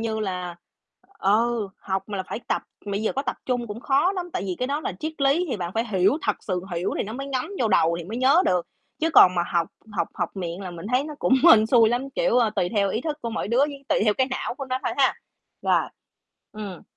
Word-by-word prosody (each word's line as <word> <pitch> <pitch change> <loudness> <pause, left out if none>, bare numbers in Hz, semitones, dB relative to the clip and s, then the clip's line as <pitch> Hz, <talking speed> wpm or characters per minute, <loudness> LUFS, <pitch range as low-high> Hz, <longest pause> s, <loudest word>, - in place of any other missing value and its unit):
như 225 -1 -2
là 180 -3 -4 0.6
ừ, 220 +2 +2
học 190 0 -2
mà 205 - -4
là 190 - -2
phải - - -4
tập, - - 0 0.2
mà 200 -1 -2
bây 215 - -2
giờ 220 - 0
có 270 - -2
tập - - -3
trung 245 -2 -1
cũng 210 +2 -7
khó 285 +9 +2
lắm, 355 -2 -5
tại - - -2
vì 185 -2 -3
cái 250 - -1
đó 290 +2 -1
là - - -3
triết 315 0 -3
lý 285 +6 +3
thì 230 - -1
bạn 175 -2 -4
phải 225 +1 +1
hiểu, 195 +8 +3
thật - - 0
sự 185 -3 -2
hiểu 170 +2 -1
thì - - 0
nó 215 - -6
mới 275 +3 -5
ngấm 260 -2 -2
vô 230 - +2
đầu 170 -4 +3
thì 170 - -6
mới 215 +7 -6
nhớ 275 +8 +5
được, 180 -2 +1 0.3
chứ 325 +1 +1
còn 185 -11 +7
mà 175 - +2
học 170 -1 +1 0.2
học 195 - -1
học 175 -3 -2
miệng 175 0 -4
là 185 -2 -6
mình 170 +2 -8
thấy 255 +3 +3
nó 305 0 -7
cũng 260 - +3 0.2
hên 220 -6 +7
xui 230 -2 +5
lắm, 255 +3 -2
kiểu, - - +2
ờ, 230 -3 +3
tùy 180 -4 0
theo 200 0 +1
ý 220 - -1
thức 300 +2 -3
của 235 - -3
mỗi 215 - -3
đứa 235 - +1
với 280 0 0
tùy - - +3
theo 210 -1 +3
cái 260 +3 +2
não 260 - -3
của 275 +1 -6
nó 255 -1 -2
thôi - - 0
ha, - - +3 0.5
rồi, - - +3 0.7
ừm. 205 -4 -7
225 Hz, 270 wpm, -24 LUFS, 190-270 Hz, 0.7 s, còn